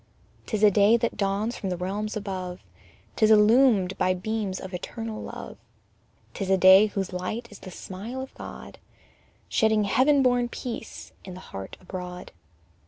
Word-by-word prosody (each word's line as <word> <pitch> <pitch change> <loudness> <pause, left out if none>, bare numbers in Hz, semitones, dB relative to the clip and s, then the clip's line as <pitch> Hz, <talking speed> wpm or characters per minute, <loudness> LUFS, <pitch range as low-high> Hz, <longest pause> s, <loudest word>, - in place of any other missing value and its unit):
'Tis 215 -2 -2
a 210 - +7
day 205 +3 +5
that 235 0 -2
dawns 205 +4 -1
from 195 - -4
the 180 - -2
realms 205 +4 -3
above, 185 -3 -5 0.5
'Tis 215 -2 +3
illumined 215 -3 +5
by 185 0 +2
beams 200 0 -3
of 190 0 -9
eternal 220 +4 -5
love: - - -8 0.8
'Tis 195 -2 -4
a 190 - +4
day 190 +3 +7
whose 195 -2 -4
light 215 +6 -4
is 205 - -12
the 185 - -10
smile 200 +8 -7
of 265 0 -7
God, - - -10 0.7
Shedding 220 -1 +2
heaven 270 +7 +3
born 245 -1 +2
peace 235 -2 -7
in 185 -2 -9
the - - -9
heart 95 0 -7
abroad. 180 -1 -8
205 Hz, 160 wpm, -26 LUFS, 185-225 Hz, 0.8 s, a